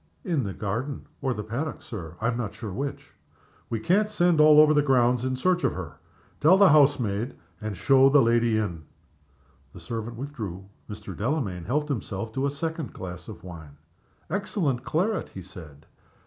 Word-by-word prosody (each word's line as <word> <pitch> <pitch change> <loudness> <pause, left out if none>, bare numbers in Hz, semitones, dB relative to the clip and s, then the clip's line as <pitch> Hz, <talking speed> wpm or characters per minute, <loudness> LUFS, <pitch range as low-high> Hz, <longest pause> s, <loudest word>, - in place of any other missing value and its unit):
"In 165 - 0
the 100 -2 -4
garden, 115 +9 -4 0.2
or 130 - 0
the 105 -4 -3
paddock, 125 +9 -4
Sir 85 -7 -8
I 115 - +1
am 120 - -1
not 115 -4 -4
sure 105 -5 -6
which." 140 +6 -5 0.6
"We 115 - -2
can't 200 - +2
send 175 -6 +3
all 150 0 +8
over 155 0 +7
the 150 - +4
grounds 125 -3 +3
in 130 0 -1
search 180 +6 +1
of - - +2
her. 80 -4 -7 0.4
Tell 165 +6 +6
the 200 -1 +7
house 145 -1 +5
maid, 110 +2 -2 0.3
and 105 -3 -4
show 135 +6 +5
the 145 +1 +6
lady 115 -2 +3
in." 90 -7 -2 0.9
The - - -10
servant 115 +6 -5
withdrew. 110 -9 -6 0.2
Mr. 105 -3 -7
Delamayn 105 - -2
helped 150 +5 -1
himself 110 -4 -4
to 135 +3 0
a - - 0
second 160 +1 -4
glass 90 -2 -8
of 100 -7 -10
wine. 80 -5 -10 0.5
"Excellent 175 - -1
claret," 190 +10 -1
he 95 - -9
said. 80 -6 -13
120 Hz, 180 wpm, -26 LUFS, 100-150 Hz, 0.9 s, all